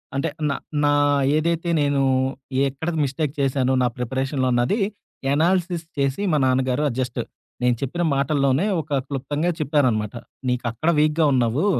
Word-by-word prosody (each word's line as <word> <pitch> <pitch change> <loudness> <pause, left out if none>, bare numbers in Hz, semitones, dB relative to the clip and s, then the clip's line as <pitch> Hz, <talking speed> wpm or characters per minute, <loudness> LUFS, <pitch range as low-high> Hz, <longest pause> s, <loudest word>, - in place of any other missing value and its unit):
అంటే 135 - 0 0.2
నా 140 - 0 0.3
నా 145 - +4 0.4
ఏదైతే 170 +2 0
నేను 145 -1 +2 0.7
ఎక్కడది 160 +4 -3
మిస్టేక్ 140 +1 -2
చేశానో, 135 -1 +1
నా 125 - +3
ప్రిపరేషన్‌లో 130 +2 -1
అన్నది 120 - +1 0.5
ఎనాలిసిస్ 175 +2 +1
చేసి, 140 +6 0
మా 150 - +4
నాన్నగారు 130 +1 +1
ఆహ్, 130 - -2
జస్ట్ 125 -1 -2 0.4
నేను 125 -1 +3
చెప్పిన 155 +6 -2
మాటల్లోనే 140 +3 +2 0.2
ఒక 145 -2 -2
క్లుప్తంగా 145 +5 -2
చెప్పారనమాట. 130 -9 +1 0.3
"నీకక్కడ 125 +4 -1
వీక్‌గా 155 +1 +3
ఉన్నావు. 125 - +1
140 Hz, 130 wpm, -22 LUFS, 130-155 Hz, 0.7 s, నా